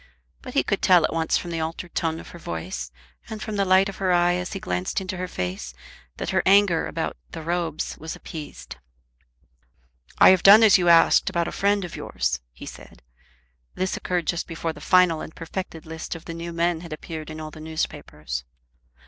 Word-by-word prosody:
But - - -9
he - - +4
could - - -1
tell 180 -3 +6
at - - 0
once 165 0 +1
from 175 - -5
the 165 - -2
altered 165 +2 -5
tone 160 -1 -1
of - - -11
her 170 - -11
voice, 80 - -5 0.4
and 220 - -6
from 215 0 -5
the 200 -1 +1
light 190 +1 +5
of 195 - -7
her 190 -2 0
eye 175 0 +4
as 180 +2 -3
he 195 - -4
glanced 185 +1 -2
into 185 -1 -5
her 185 0 -3
face, 90 - -5 0.4
that - - -3
her - - +2
anger 195 -4 +4
about 165 - -3 0.2
"The 165 - -6
Robes" 165 -2 -2
was 160 +1 -6
appeased. 150 - -9 1.4
"I - - +8
have 185 -1 +5
done 210 +3 +9
as 205 -3 +7
you 175 -1 +3
asked 165 -1 +6
about 170 -1 0
a - - -4
friend 200 -1 +1
of 175 - -8
yours," 60 +2 -2
he - - -11
said. - - -12 0.7
This 185 0 -1
occurred 180 -2 -2
just 170 +1 -1
before 165 0 -3
the 150 - -13
final 180 -2 +4
and 160 - -9
perfected 165 -1 -6
list 160 +1 -6
of 165 - -10
the 165 - -6
new 170 +1 -6
men 170 0 0
had 170 -3 -7
appeared 155 0 -7
in 155 0 -7
all 155 0 -7
the 155 - -11
newspapers. 75 - -4
170 Hz, 210 wpm, -24 LUFS, 160-185 Hz, 1.4 s, done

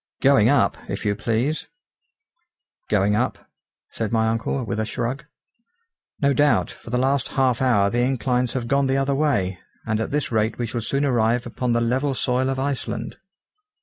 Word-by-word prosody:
"Going - - +5
up, - - +2
if - - -4
you 105 -1 +1
please." 120 +8 -1 1.2
"Going 105 0 +2
up!" 125 +4 0 0.5
said 110 -2 -3
my 110 -1 +2
uncle, 115 +4 -1
with 110 -1 -3
a - - +1
shrug. 125 +4 -3 0.9
"No 140 -1 +3
doubt, 145 +1 +2
for - - -13
the 125 - 0
last 135 +1 +1
half 130 -3 +2
hour 105 -6 +3
the 120 - 0
inclines 125 -1 0
have 125 -3 -3
gone 140 +1 +2
the 135 0 +1
other 135 +1 +1
way, 100 -11 0 0.3
and 110 -1 0
at - - -2
this 145 -2 -1
rate 110 0 0
we 120 - -1
shall 115 +1 -3
soon 140 +5 0
arrive 120 -2 +1
upon 120 0 -2
the 120 - +2
level 130 +4 0
soil 130 +1 0
of 135 - -1
Iceland." 130 -4 -3
125 Hz, 180 wpm, -23 LUFS, 110-135 Hz, 1.2 s, Going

